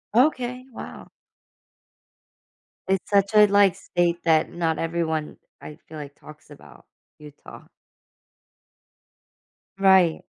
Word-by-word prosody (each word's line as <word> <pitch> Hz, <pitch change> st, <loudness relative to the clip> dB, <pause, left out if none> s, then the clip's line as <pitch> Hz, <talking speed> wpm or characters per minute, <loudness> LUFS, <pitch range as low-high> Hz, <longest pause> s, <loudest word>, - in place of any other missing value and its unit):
Okay. 250 Hz, -1 st, +1 dB
Wow. -, -, -10 dB, 1.8 s
It's 190 Hz, -1 st, -1 dB
such 200 Hz, 0 st, +2 dB
a 210 Hz, 0 st, +7 dB
like 200 Hz, -2 st, +3 dB
state 175 Hz, -1 st, -1 dB
that 160 Hz, -1 st, +2 dB
not 165 Hz, -2 st, -2 dB
everyone, 160 Hz, -2 st, -3 dB, 0.2 s
I 150 Hz, -, -11 dB
feel 155 Hz, -, -10 dB
like, 145 Hz, -1 st, -9 dB
talks 155 Hz, 0 st, -16 dB
about- 145 Hz, -, -16 dB, 0.3 s
Utah. 150 Hz, -1 st, -14 dB, 2.1 s
Right. 190 Hz, -4 st, +3 dB
170 Hz, 100 wpm, -23 LUFS, 155-200 Hz, 2.1 s, a